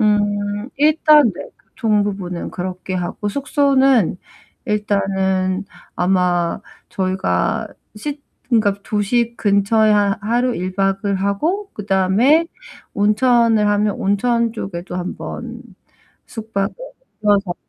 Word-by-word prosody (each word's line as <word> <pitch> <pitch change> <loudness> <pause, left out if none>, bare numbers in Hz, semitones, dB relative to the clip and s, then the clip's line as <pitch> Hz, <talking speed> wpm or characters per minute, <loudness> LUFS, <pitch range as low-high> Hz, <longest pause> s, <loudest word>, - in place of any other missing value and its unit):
음 205 0 0
일단 300 - +5
네 - - -9 0.2
교통 215 -4 0
부분은 185 -4 -4
그렇게 185 +1 -5
하고, 180 +3 -3
숙소는 270 - +2 0.5
일단은 195 -2 0 0.3
아마 180 -2 +1 0.3
저희가 185 - -1 0.3
시 290 +6 -5 0.3
그니까 220 -5 +3
도시 230 +3 0
근처에 205 +2 +2
하 205 -1 +2
하루 240 +3 +1
1 185 +2 -4
박을 195 0 0
하고 305 - -1
그다음에 210 - +2 0.5
온천을 220 +1 +3
하면 205 0 +1
온천 230 +3 +1
쪽에도 180 -5 -6
한번 235 +6 -6 0.6
숙박을 215 -3 -3 0.5
껴서 200 -3 +2
205 Hz, 210 characters per minute, -19 LUFS, 190-235 Hz, 0.6 s, 일단